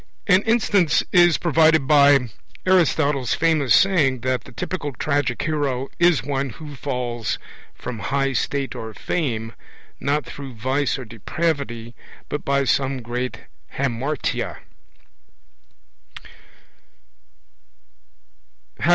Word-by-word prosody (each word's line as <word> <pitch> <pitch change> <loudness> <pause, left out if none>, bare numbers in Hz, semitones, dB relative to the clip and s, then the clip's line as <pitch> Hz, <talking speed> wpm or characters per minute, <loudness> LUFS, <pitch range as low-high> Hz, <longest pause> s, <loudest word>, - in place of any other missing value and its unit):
An 190 -1 +5
instance 205 -8 +3
is 175 -2 +5
provided 160 -3 +3
by 140 -3 +5 0.4
Aristotle's 155 -7 +2
famous 155 -5 +3
saying 150 -10 +3
that 130 -1 -1
the - - -12
typical 145 +2 -4
tragic 140 -1 -1
hero 140 -4 -1
is 170 -9 +4
one 135 0 -2
who 150 +5 -10
falls 125 -4 -3 0.4
from 120 -3 -6
high 135 +5 0
state 140 +1 -1
or 110 -1 -7
fame, 115 -9 -2 0.5
not 145 +1 0
through 135 -3 -8
vice 130 +6 0
or 130 - -7
depravity, 120 - -3 0.4
but 145 - -3
by 140 0 +1
some 135 -1 0
great 125 +2 -4 0.3
hamartia. 140 +2 -2
140 Hz, 100 wpm, -22 LUFS, 125-155 Hz, 0.5 s, An